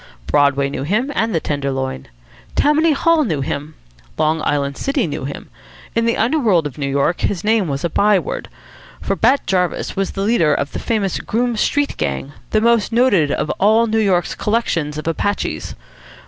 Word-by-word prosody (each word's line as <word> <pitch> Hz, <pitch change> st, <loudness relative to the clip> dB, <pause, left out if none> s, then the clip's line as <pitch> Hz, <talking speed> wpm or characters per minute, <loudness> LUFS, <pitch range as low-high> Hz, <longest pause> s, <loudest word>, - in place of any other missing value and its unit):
Broadway 140 Hz, -, +2 dB
knew 140 Hz, -, -4 dB
him, 215 Hz, -, 0 dB
and 225 Hz, -6 st, 0 dB
the -, -, +3 dB
Tenderloin. 135 Hz, -, -3 dB, 0.5 s
Tammany 310 Hz, +2 st, +3 dB
Hall 330 Hz, +2 st, +3 dB
knew 160 Hz, -, -1 dB
him. 145 Hz, +3 st, -4 dB, 0.4 s
Long 155 Hz, +1 st, +1 dB
Island 140 Hz, -2 st, -1 dB
City 275 Hz, -, -1 dB
knew 145 Hz, -4 st, -4 dB
him. 140 Hz, -, -7 dB, 0.4 s
In 230 Hz, 0 st, +1 dB
the 230 Hz, -, +1 dB
underworld 225 Hz, -, +2 dB
of 145 Hz, -1 st, -6 dB
New 140 Hz, -1 st, -1 dB
York 140 Hz, +5 st, 0 dB
his 180 Hz, -4 st, -1 dB
name 215 Hz, -3 st, +2 dB
was 140 Hz, -1 st, -3 dB
a 170 Hz, -, 0 dB
by 205 Hz, +3 st, +4 dB
word. -, -, -4 dB, 0.5 s
For -, -, -1 dB
Bat 275 Hz, +2 st, +2 dB
Jarvis 180 Hz, -2 st, -1 dB
was 195 Hz, 0 st, -2 dB
the 195 Hz, -, -2 dB
leader 170 Hz, -9 st, +3 dB
of 140 Hz, -, -2 dB
the -, -, -5 dB
famous 205 Hz, -5 st, -1 dB
Groome 240 Hz, +1 st, -1 dB
Street 285 Hz, +6 st, 0 dB
Gang, 70 Hz, -, -3 dB, 0.2 s
the 215 Hz, -, +2 dB
most 235 Hz, -1 st, +2 dB
noted 225 Hz, -, +3 dB
of -, -, -1 dB
all 220 Hz, +3 st, +4 dB
New 225 Hz, 0 st, 0 dB
York's 190 Hz, -5 st, +1 dB
collections 170 Hz, -9 st, -1 dB
of 155 Hz, -, -6 dB
Apaches. 205 Hz, +5 st, -2 dB
190 Hz, 180 wpm, -19 LUFS, 145-230 Hz, 0.5 s, by